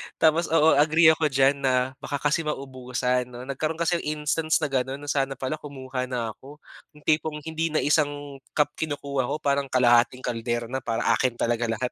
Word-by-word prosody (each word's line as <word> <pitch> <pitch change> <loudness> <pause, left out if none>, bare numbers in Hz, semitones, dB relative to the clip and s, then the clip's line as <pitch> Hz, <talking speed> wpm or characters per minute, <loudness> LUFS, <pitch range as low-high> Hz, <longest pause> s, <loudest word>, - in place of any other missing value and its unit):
Tapos 160 +1 +3
oo, 160 0 +4
agree 160 +2 +6
ako 155 0 +1
diyan 135 0 +3
na 130 -1 +1
baka 145 - -4
kasi 145 +3 +2
maubusan, 125 -3 -2
'no. 125 0 -9
Nagkaroon 145 +4 -3
kasi 170 0 +1
instance 155 +1 0
na 140 - -1
gano'n 130 0 -1
na 145 - -2
sana 135 -1 0
pala 135 +4 -4
kumuha 130 -3 -5
na 120 -3 -3
ako, 140 +5 -14 0.4
'yong 150 - -17
tipong 155 0 0
hindi 160 0 -2
na 155 - 0
isang 145 -2 0 0.2
cup 150 -1 +2
kinukuha 140 -4 -2
ko - - -1
parang 140 -1 +1
kalahating 125 0 +3
kaldero 120 0 -3
na 130 - -1
para 115 -2 -2
akin 120 +1 +1
talaga 120 0 0
lahat. 115 +2 -2
135 Hz, 185 wpm, -25 LUFS, 125-150 Hz, 0.4 s, agree